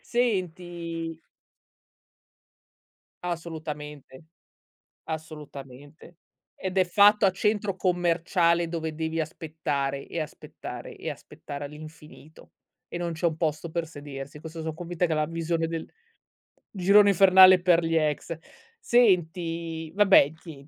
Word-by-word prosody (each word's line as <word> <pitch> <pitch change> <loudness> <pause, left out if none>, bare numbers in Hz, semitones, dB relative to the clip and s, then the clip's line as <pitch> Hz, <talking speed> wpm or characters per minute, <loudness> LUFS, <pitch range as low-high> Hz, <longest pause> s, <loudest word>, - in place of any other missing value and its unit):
Senti 175 -7 -2 2.1
Assolutamente, 150 -5 -6 0.8
assolutamente. 150 -1 -9 0.4
Ed 190 0 -3
è 185 - +5
fatto 205 +3 +5
a 190 - +3
centro 210 0 0
commerciale 175 -1 +1
dove 160 -2 -4
devi 160 +1 -3
aspettare, 150 -3 -3
e 170 - -4
aspettare, 155 - -8
e - - -5
aspettare 145 0 -8
all'infinito, 155 +1 -12 0.4
e 175 - -5
non 170 -1 -2
c'è 160 +2 -1
un 160 - 0
posto 160 0 -2
per 170 0 -2
sedersi. 145 -1 -9
Questo 160 0 -8
so' 160 -1 -4
convinta 175 +1 -2
che 165 - -3
è - - +3
la 155 0 +1
visione 165 0 -1
del 165 -1 -4 0.9
girone 200 +1 +5
infernale 185 -1 +7
per 175 -1 +4
gli 165 0 0
ex. 155 +1 0 0.4
Senti, 170 -7 +1
vabbè 195 -7 +5
ti 160 -4 -13
165 Hz, 115 wpm, -26 LUFS, 155-180 Hz, 2.1 s, infernale